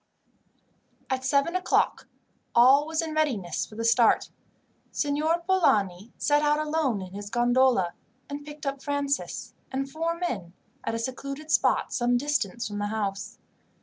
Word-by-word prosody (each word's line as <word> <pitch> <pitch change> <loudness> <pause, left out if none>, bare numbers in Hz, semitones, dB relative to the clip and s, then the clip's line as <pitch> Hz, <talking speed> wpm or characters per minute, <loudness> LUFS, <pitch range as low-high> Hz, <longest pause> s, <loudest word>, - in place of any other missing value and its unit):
At 260 0 -1
seven 280 +6 +2
o'clock 370 - +1 0.5
all 265 +5 +6
was 320 +1 -1
in 320 -1 -4
readiness 255 - -1
for 215 - -11
a - - -1
start. 230 0 +4 0.6
Signor 310 +4 0
Polani 210 - +2
set 295 0 +2
out 295 0 +3
alone 300 -9 0
in 185 0 -10
his 205 0 -6
gondola, 240 -5 +3 0.3
and 285 0 -6
picked 295 +1 -10
up 275 -1 -3
Francis, 285 0 -2 0.2
and 270 +1 -2
four 330 +3 -2
men, 200 - -3 0.3
at 225 - -2
a - - -1
secluded 275 +5 -5
spot - - +2
some 245 -2 +2
distance 240 -5 -1
from 205 -1 -5
the 205 - -1
house. 205 -2 -3
270 Hz, 150 wpm, -27 LUFS, 225-300 Hz, 0.6 s, all